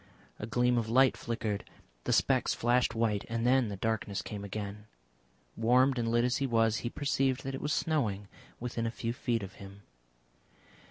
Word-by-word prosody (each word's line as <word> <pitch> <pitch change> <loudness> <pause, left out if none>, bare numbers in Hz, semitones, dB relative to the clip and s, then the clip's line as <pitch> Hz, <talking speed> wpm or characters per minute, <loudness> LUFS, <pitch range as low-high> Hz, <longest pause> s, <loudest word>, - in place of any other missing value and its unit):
A 105 - -5
gleam 120 +1 +2
of 110 -1 -3
light 130 +2 +5
flickered, 110 -3 -3 0.4
the - - 0
specks - - +2
flashed 120 -1 +2
white, 110 -3 +1
and 115 0 -1
then 130 -1 +4
the 100 - -4
darkness 110 -1 -2
came 100 -1 -6
again. 105 +1 -6 0.7
Warmed 125 +3 +3
and 115 - 0
lit 120 +1 +2
as 125 0 +1
he 135 - 0
was, 115 -2 +2
he 120 - -3
perceived 135 -1 0
that 135 - -4
it 135 - -5
was 150 - -2
snowing 110 -12 0 0.3
within 115 -1 -2
a - - 0
few 115 0 -3
feet 120 -4 -1
of 95 -1 -8
him. 100 +1 -11
115 Hz, 180 wpm, -31 LUFS, 105-125 Hz, 0.7 s, light